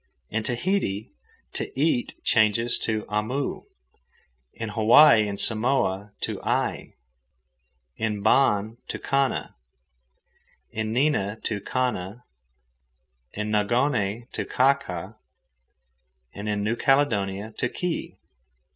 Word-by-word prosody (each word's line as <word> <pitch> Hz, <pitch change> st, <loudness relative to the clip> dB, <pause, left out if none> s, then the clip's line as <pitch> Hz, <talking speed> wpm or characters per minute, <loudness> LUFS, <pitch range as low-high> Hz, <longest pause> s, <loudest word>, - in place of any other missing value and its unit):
In 110 Hz, -, 0 dB
Tahiti 120 Hz, -, -1 dB, 0.4 s
"to -, -, -4 dB
eat" 145 Hz, -5 st, +1 dB
changes 115 Hz, +2 st, +3 dB
to 110 Hz, -1 st, -1 dB
amu, 110 Hz, +7 st, -2 dB, 0.9 s
in 115 Hz, -1 st, -6 dB
Hawaii 110 Hz, +2 st, +6 dB
and 100 Hz, -1 st, -4 dB
Samoa 110 Hz, -4 st, +1 dB
to -, -, -3 dB
ai, -, -, -2 dB, 1.0 s
in 105 Hz, -2 st, -2 dB
Ban 110 Hz, -2 st, +3 dB
to -, -, -4 dB
kana, 140 Hz, -1 st, 0 dB, 1.2 s
in 110 Hz, 0 st, -3 dB
Nina 115 Hz, -5 st, +1 dB
to 105 Hz, -3 st, -2 dB
kana, 120 Hz, -3 st, -2 dB, 1.1 s
in 105 Hz, +1 st, -3 dB
Nongone 110 Hz, 0 st, +1 dB
to -, -, -3 dB
kaka, 115 Hz, -7 st, 0 dB, 1.2 s
and 105 Hz, +1 st, -5 dB
in 105 Hz, -1 st, -1 dB
New 110 Hz, +3 st, 0 dB
Caledonia 110 Hz, -7 st, +1 dB
to 125 Hz, -, 0 dB
ki. 180 Hz, +4 st, -4 dB
110 Hz, 100 wpm, -25 LUFS, 105-130 Hz, 1.2 s, Hawaii